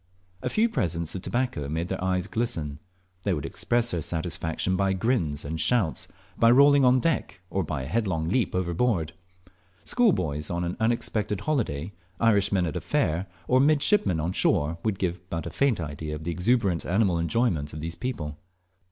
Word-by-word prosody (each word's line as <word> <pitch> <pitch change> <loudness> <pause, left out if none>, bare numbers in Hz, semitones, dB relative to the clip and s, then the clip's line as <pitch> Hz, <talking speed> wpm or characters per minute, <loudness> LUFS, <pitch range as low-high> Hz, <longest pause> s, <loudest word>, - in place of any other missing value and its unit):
A - - -1
few 220 +2 +3
presents 85 - -1
of 95 - -5
tobacco 120 - -2
made 80 +3 -2
their 95 -1 -3
eyes 90 -1 0
glisten; 85 -11 -2 0.4
they 95 -1 0
would 75 - -4
express 120 0 0
their 85 - -1
satisfaction 80 +2 -2
by 95 0 +1
grins 90 - 0
and 80 +2 -3
shouts, 110 -11 +1 0.3
by 115 - +6
rolling 140 +3 +6
on 125 0 +5
deck, 160 - -1
or 95 - 0
by 75 -4 -3
a - - -5
headlong 85 - -1
leap 110 +5 0
overboard. 85 -2 0 0.7
Schoolboys 80 - +1
on 85 0 -1
an 85 +1 -2
unexpected 110 -3 0
holiday, 100 - -1 0.3
Irishmen 100 -4 +3
at 80 - -3
a - - -2
fair, 85 +5 0 0.2
or 130 - +4
mid 145 +1 +4
shipmen 205 - +2
on 85 +4 -1
shore, 80 0 +1
would 105 -3 0
give 90 -2 -2
but 80 -2 -3
a - - -5
faint 140 -7 +1
idea 75 -1 -4
of 75 - -8
the 85 - -2
exuberant 95 0 +1
animal 95 -3 +2
enjoyment 85 -4 0
of 75 - -7
these 80 +2 -4
people. 85 - -5
90 Hz, 180 wpm, -26 LUFS, 80-115 Hz, 0.7 s, by